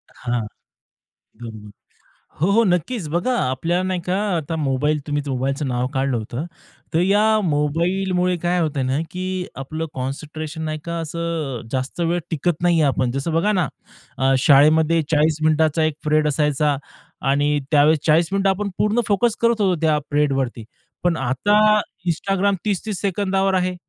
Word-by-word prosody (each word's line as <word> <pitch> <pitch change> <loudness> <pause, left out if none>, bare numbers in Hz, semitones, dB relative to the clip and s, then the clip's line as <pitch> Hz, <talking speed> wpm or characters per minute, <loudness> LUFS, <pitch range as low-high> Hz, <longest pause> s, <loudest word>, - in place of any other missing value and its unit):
हां. 120 -1 -2 1.0
बरोबर. 110 -2 -9 0.7
हो, 175 +5 +2
हो, 225 +3 +4
नक्कीच. 180 +1 0
बघा, 175 +11 0
आपल्याला 165 - 0
नाही 185 -1 -1
का? 180 - 0 0.2
आता 160 0 -3
मोबाईल 150 +1 0
तुम्ही 145 0 -1
मोबाईलचं 135 +2 -2
नाव 125 0 -1
काढलं 135 -1 0
होतं. 120 +6 -4 0.5
तर 165 - +3
या 210 +4 +3
मोबाईलमुळे 180 +3 0
काय 175 +1 +1
होतंय 150 -4 -1
ना 130 +2 0
की 185 0 -3
आपलं 155 +4 -4
कॉन्सन्ट्रेशन 155 +4 -5
नाही 155 0 -3
का? 170 0 -4
असं 165 -5 -3
जास्त 130 +5 -3
वेळ 170 +1 +1
टिकत 165 +1 -1
नाही 175 -2 +3
आहे. 150 - +4
आपण 130 -2 0
जसं 140 +6 -3
बघा 170 +6 +2
ना, 180 -5 +1 0.7
शाळेमध्ये 155 +4 +5
40 155 0 +3
मिनिटाचा 155 0 +2
एक 155 -1 0
पीरियड 150 0 +2
असायचा 150 0 +1 0.5
आणि 145 +1 +2
त्यावेळेस 150 +1 +5
40 160 +2 +4
मिनिटं 195 0 +2
आपण 200 +2 -1
पूर्ण 210 +3 +2
फोकस 215 +3 +2
करत 235 -1 +2
होतो, 190 -3 +3
त्या 155 -2 +2
पीरियडवरती. 135 -5 0 0.4
पण 175 -2 +2
आता 135 +11 +1 0.5
Instagram 195 +4 0
30-30 205 -2 -2
सेकंदावर 195 0 0
आहे, 185 0 +1
160 Hz, 150 wpm, -21 LUFS, 145-180 Hz, 1.0 s, शाळेमध्ये